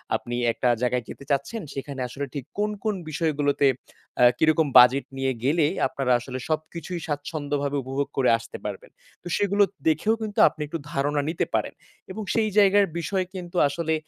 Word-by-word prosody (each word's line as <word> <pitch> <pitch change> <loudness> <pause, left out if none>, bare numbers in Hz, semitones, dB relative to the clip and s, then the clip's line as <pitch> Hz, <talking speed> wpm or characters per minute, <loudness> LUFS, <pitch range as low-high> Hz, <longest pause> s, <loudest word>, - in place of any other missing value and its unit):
আপনি 120 - -4 0.2
একটা 125 - 0
জায়গায় 125 0 0
যেতে - - -9
চাচ্ছেন, 140 +12 -1
সেখানে 135 0 -6
আসলে 140 +3 -5
ঠিক 140 -4 -5
কোন, 210 +1 +1
কোন 215 -2 0
বিষয়গুলোতে 145 -3 +1 0.5
আ - - +7 0.2
কিরকম 155 0 +3
বাজেট 125 +2 +7
নিয়ে 135 0 0
গেলে 150 +4 +3 0.2
আপনারা 135 -2 -2
আসলে 125 +2 -6
সবকিছুই 160 +2 -3
স্বাচ্ছন্দ্যভাবে 145 -1 -2
উপভোগ 135 +2 -2
করে 130 -2 +3
আসতে 115 - -9
পারবেন। - - -6 0.3
তো - - -8
সেগুলো 205 0 +3 0.2
দেখেও 160 +8 +2
কিন্তু 215 -2 -3
আপনি 155 - -5
একটু 165 +3 -4
ধারণা 145 +1 0
নিতে 165 - -1
পারেন। - - 0 0.4
এবং 215 - -5
সেই 220 -2 +2
জায়গার 200 0 +6
বিষয় 185 +2 -1
কিন্তু 180 -1 -6
আসলে 160 +2 -2
150 Hz, 165 wpm, -25 LUFS, 140-175 Hz, 0.5 s, আ